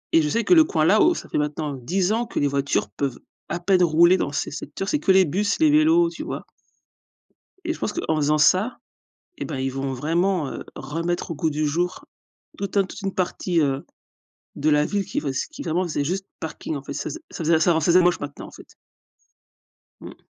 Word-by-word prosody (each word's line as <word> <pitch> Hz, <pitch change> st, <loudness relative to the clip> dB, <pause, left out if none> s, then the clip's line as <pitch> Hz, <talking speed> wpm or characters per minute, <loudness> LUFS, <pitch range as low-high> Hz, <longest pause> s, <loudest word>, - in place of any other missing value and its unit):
Et 165 Hz, -, +7 dB
je 150 Hz, -, 0 dB
sais 230 Hz, +8 st, 0 dB
que -, -, +4 dB
le 325 Hz, -2 st, +8 dB
coin 160 Hz, -, 0 dB
là, 200 Hz, +6 st, +5 dB
oh, 345 Hz, -, +4 dB
ça -, -, -7 dB
fait -, -, -1 dB
maintenant 150 Hz, 0 st, -2 dB
10 180 Hz, -, 0 dB
ans 235 Hz, +2 st, 0 dB
que -, -, -3 dB
les 145 Hz, -, +2 dB
voitures 140 Hz, -4 st, 0 dB
peuvent 130 Hz, +3 st, -3 dB, 0.3 s
à 170 Hz, -, -2 dB
peine 180 Hz, +1 st, +3 dB
rouler 170 Hz, +2 st, +5 dB
dans 140 Hz, -, -1 dB
ces 145 Hz, -, -3 dB
secteurs. 195 Hz, +5 st, -6 dB
C'est 300 Hz, -, +1 dB
que 195 Hz, -, +2 dB
les 190 Hz, 0 st, +6 dB
bus, 200 Hz, +7 st, -1 dB
les 315 Hz, -2 st, +5 dB
vélos, 325 Hz, +3 st, +4 dB
tu -, -, -8 dB
vois -, -, -6 dB, 1.2 s
et 330 Hz, -, 0 dB
je -, -, -11 dB
pense 210 Hz, -, -2 dB
qu'en 160 Hz, -, -1 dB
faisant 150 Hz, 0 st, +2 dB
ça, 185 Hz, +10 st, +3 dB, 0.6 s
eh -, -, -4 dB
ben 150 Hz, -, -5 dB
ils 130 Hz, 0 st, -1 dB
vont 135 Hz, 0 st, -3 dB
vraiment, 165 Hz, +4 st, 0 dB
heu, -, -, -6 dB
remettre 165 Hz, +6 st, -3 dB
au -, -, -3 dB
goût 160 Hz, +2 st, 0 dB
du 155 Hz, 0 st, -1 dB
jour 175 Hz, +5 st, -2 dB, 0.5 s
toute 200 Hz, +1 st, -3 dB
un 200 Hz, -, +5 dB
toute 200 Hz, +2 st, -10 dB
une 195 Hz, -1 st, -3 dB
partie, 180 Hz, -1 st, -1 dB
heu, 135 Hz, -2 st, -1 dB, 0.7 s
de 150 Hz, -, +1 dB
la 150 Hz, 0 st, +4 dB
ville 200 Hz, +1 st, -1 dB
qui -, -, -3 dB
fais 140 Hz, -, -2 dB, 0.2 s
qui 310 Hz, -, -9 dB
vraiment 175 Hz, +3 st, 0 dB
faisait 155 Hz, -4 st, -2 dB
juste 190 Hz, +6 st, -3 dB
parking, 160 Hz, 0 st, -5 dB
en 140 Hz, -, -6 dB
fait. 140 Hz, -, -6 dB
Ça 140 Hz, -, -4 dB
faisait -, -, -6 dB
ça -, -, -5 dB
faisait 160 Hz, 0 st, +3 dB
ça 170 Hz, +2 st, +3 dB
leur 160 Hz, -2 st, +1 dB
faisait 175 Hz, +3 st, +5 dB
moche 175 Hz, 0 st, +2 dB
maintenant, 145 Hz, 0 st, -7 dB
en -, -, -13 dB
fait. -, -, -15 dB, 1.3 s
Mmh. -, -, -12 dB
170 Hz, 230 wpm, -23 LUFS, 150-195 Hz, 1.3 s, le